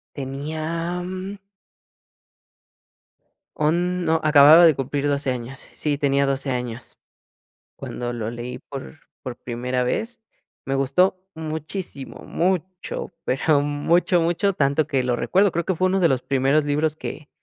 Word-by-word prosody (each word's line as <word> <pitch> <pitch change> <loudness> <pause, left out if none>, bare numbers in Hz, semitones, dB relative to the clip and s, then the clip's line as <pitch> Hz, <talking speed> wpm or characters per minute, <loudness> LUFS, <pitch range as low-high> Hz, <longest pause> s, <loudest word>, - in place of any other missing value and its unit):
Tenía 155 +5 -3
mm 185 +2 -6 2.2
on 175 +3 +1
no, 160 0 +2
acababa 155 +3 +8
de 160 - +6
cumplir 140 +2 -2
12 140 -2 0
años, 125 +2 -6
sí, 150 -2 -1
tenía 140 -1 +2
12 135 0 -1
años, 125 -2 -5 0.8
cuando 120 0 -5
lo 115 -2 -3
leí 120 +1 -6
por 140 +2 -9 0.2
por 130 -2 -6
primera 125 +1 -2
vez, 225 - -2 0.5
me 135 - -1
gustó 140 +8 +2 0.2
muchísimo, 160 -2 -6
mucho, 185 +1 -2
pero 145 +3 +2
mucho, 165 +4 +2
mucho, 175 +4 +1
tanto 140 -1 +1
que 135 -3 0
lo 125 -1 +1
recuerdo, 195 0 +3
creo 170 0 -2
que 190 - 0
fue 185 +3 +2
1 190 +1 +1
de 175 - +5
los 130 -3 +1
primeros 140 +2 +2
libros 150 +1 0
que 150 -1 -7
150 Hz, 140 wpm, -23 LUFS, 135-170 Hz, 2.2 s, acababa